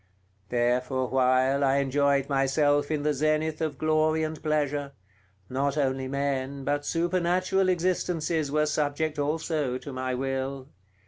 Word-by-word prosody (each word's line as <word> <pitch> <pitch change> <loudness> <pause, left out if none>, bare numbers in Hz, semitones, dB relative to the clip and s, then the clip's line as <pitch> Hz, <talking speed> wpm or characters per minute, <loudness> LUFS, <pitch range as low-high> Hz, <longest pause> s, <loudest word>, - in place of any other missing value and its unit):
There 120 +1 +2
for 130 +1 -2
a - - 0
while 130 +2 +2
I 135 0 +3
enjoyed 140 0 +2
myself 145 +1 +2
in 150 -2 -1
the 150 0 +2
zenith 155 +2 0
of 155 -3 -2
glory 155 +1 +2
and 155 -1 -4
pleasure; 145 -2 -1 0.5
not 140 +4 -1
only 135 -2 0
men, 140 0 -2
but 145 +1 -1
supernatural 185 +2 +1
existences 170 -4 0
were 150 +1 +2
subject 150 0 -1
also 150 -3 -1
to 140 +1 -8
my 130 0 -2
will. 135 +1 -3
145 Hz, 140 wpm, -27 LUFS, 135-155 Hz, 0.5 s, I